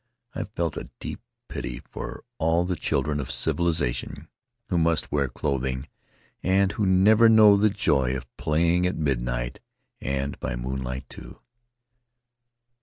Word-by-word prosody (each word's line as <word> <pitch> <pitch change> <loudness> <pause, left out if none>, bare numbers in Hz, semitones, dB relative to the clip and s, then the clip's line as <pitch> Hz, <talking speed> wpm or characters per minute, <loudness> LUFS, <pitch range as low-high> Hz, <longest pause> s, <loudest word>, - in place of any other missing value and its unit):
I - - -3
felt 85 -3 -1
a - - -6
deep - - -6 0.3
pity - - -5
for - - -6 0.2
all 80 +2 +2
the 90 0 -1
children 75 -1 -1
of 65 - -4
civilization 80 -3 -1 0.4
who 90 - +2
must 80 -1 +1
wear 70 -2 +1
clothing 65 +1 -2 0.5
and 95 +1 +3
who 105 -1 0
never 105 +5 +6
know 110 -2 +8
the 105 +2 +4
joy 70 -10 +1
of 60 -1 -12
playing 85 +3 +2
at 90 - -2
midnight, - - -1 0.4
and 70 +1 -2
by 60 - -3
moonlight 65 +1 -4
too. - - -12
75 Hz, 135 wpm, -25 LUFS, 65-90 Hz, 0.5 s, know